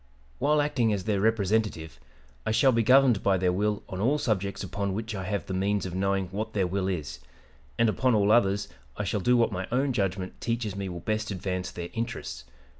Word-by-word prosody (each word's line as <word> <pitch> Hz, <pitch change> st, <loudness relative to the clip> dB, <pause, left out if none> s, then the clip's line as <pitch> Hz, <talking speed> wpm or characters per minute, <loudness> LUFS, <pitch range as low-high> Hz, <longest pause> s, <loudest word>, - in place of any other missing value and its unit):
"While 150 Hz, +2 st, +3 dB
acting 120 Hz, -6 st, +1 dB
as 100 Hz, -3 st, -1 dB
their 100 Hz, -1 st, 0 dB
Representative, 105 Hz, -, 0 dB, 0.4 s
I -, -, -2 dB
shall 130 Hz, +5 st, +4 dB
be 115 Hz, -1 st, +2 dB
governed 125 Hz, -2 st, +5 dB
by 95 Hz, -1 st, +3 dB
their 90 Hz, 0 st, +2 dB
will 105 Hz, +2 st, 0 dB
on 95 Hz, -2 st, -6 dB
all 135 Hz, +7 st, +3 dB
subjects 100 Hz, -9 st, -1 dB
upon 100 Hz, +1 st, -3 dB
which 110 Hz, +1 st, -4 dB
I 95 Hz, -2 st, -4 dB
have 100 Hz, +1 st, -2 dB
the 95 Hz, -, -5 dB
means 100 Hz, +2 st, 0 dB
of 90 Hz, -, -5 dB
knowing 95 Hz, +1 st, 0 dB
what 105 Hz, +3 st, -4 dB
their 100 Hz, -3 st, +1 dB
will 95 Hz, +1 st, -1 dB
is; 75 Hz, -9 st, -3 dB, 0.6 s
and 115 Hz, -, +4 dB
upon 125 Hz, +2 st, +2 dB
all 105 Hz, 0 st, +3 dB
others 100 Hz, -3 st, +3 dB, 0.3 s
I 105 Hz, -, -1 dB
shall 105 Hz, +2 st, -1 dB
do 125 Hz, +5 st, +3 dB
what 115 Hz, -, +3 dB
my 95 Hz, -1 st, -3 dB
own 130 Hz, +2 st, +1 dB
judgment 95 Hz, -4 st, -2 dB
teaches 115 Hz, -4 st, -2 dB
me 100 Hz, -1 st, -4 dB
will 85 Hz, -1 st, -6 dB
best 110 Hz, +1 st, -2 dB
advance 95 Hz, -2 st, -3 dB
their 85 Hz, 0 st, -6 dB
interests. 70 Hz, -, -4 dB
100 Hz, 210 wpm, -27 LUFS, 95-115 Hz, 0.6 s, governed